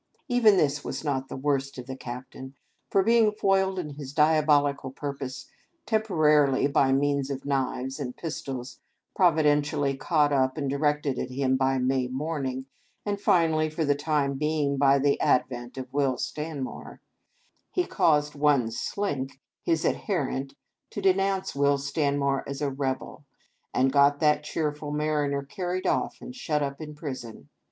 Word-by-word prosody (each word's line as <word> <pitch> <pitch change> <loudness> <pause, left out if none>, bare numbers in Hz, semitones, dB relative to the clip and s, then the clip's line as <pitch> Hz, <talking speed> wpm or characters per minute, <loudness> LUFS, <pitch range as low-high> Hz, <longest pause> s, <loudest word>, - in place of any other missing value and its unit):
Even 235 -6 +5
this 150 -3 +1
was - - -5
not 135 -3 -1
the - - -6
worst 140 0 -1
of 125 - -7
the 130 0 -6
Captain; 130 +1 -8 0.3
for, 195 - +3
being 230 0 +4
foiled 195 -2 +1
in 160 -5 -4
his 140 -1 -8
diabolical 150 -3 +3
purpose 135 -1 -6 0.2
— 340 -1 -46
temporarily 155 - +3
by 140 -2 +3
means 140 0 +1
of 135 -1 -5
knives 135 -1 -2
and 125 -3 -5
pistols, 130 -6 -6 0.4
providentially 150 -5 +2
caught 145 +1 +2
up 130 0 +1
and 140 -3 -1
directed 145 -1 0
at - - -3
him 130 0 +1
by 135 0 +1
May 130 0 +1
Morning, 130 -1 -3 0.4
and 200 -1 -2
finally, 165 -6 +3
for 155 +1 -2
the 145 - +3
time 145 -2 -1
being, 150 -2 0
by 140 0 +5
the 140 +1 +1
ad 125 - +4
vent 120 0 -8
of 130 0 -7
Will 135 -3 +1
Stanmore 150 -3 -5 0.4
— - - -40 0.3
he 360 - 0
caused 150 - +2
one 140 -6 +2
Slink, 135 - -3 0.2
his 165 -2 0
adherent, 140 -7 -1 0.3
to - - -6
denounce 195 0 +1
Will 140 0 +3
Stanmore 140 -1 0
as 140 -1 -4
a 145 -2 -1
rebel, 135 +1 -4 0.5
and 130 +1 +2
got 145 0 +4
that 150 -1 +3
cheerful 150 -1 -3
mariner 150 -2 0
carried 180 +4 -4
off - - 0
and 250 - -9
shut 150 - -1
up 140 +2 -4
in 150 -1 -7
prison. 130 -7 -7
145 Hz, 160 wpm, -27 LUFS, 135-155 Hz, 0.5 s, Even